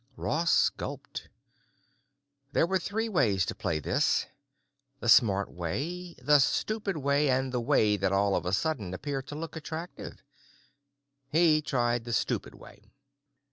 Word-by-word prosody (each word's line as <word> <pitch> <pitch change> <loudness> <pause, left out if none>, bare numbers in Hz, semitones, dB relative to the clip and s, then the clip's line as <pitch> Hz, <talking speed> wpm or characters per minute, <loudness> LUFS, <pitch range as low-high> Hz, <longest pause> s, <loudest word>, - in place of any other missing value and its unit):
Ross 165 +3 +2
gulped. 140 -1 -8 1.2
There - - +3
were 190 +2 0
three 220 +5 -2
ways 105 - +2
to - - -3
play 80 - -2
this, 75 - +1 0.7
the 115 - -5
smart 100 -4 +4
way, 165 - -4
the 145 +3 +4
stupid 205 +6 0
way, 140 0 +1
and 130 0 +1
the 125 -1 -1
way 115 -5 +3
that 95 -1 0
all 100 0 +2
of - - -1
a - - 0
sudden 115 - -1
began 135 +9 -4
to 145 +2 -9
look 165 +2 -6
attractive. 160 +2 -7 1.1
He 155 0 +4
tried 120 -4 0
the 120 - -4
stupid - - -1
way. 105 +1 -16
140 Hz, 140 wpm, -29 LUFS, 105-160 Hz, 1.2 s, smart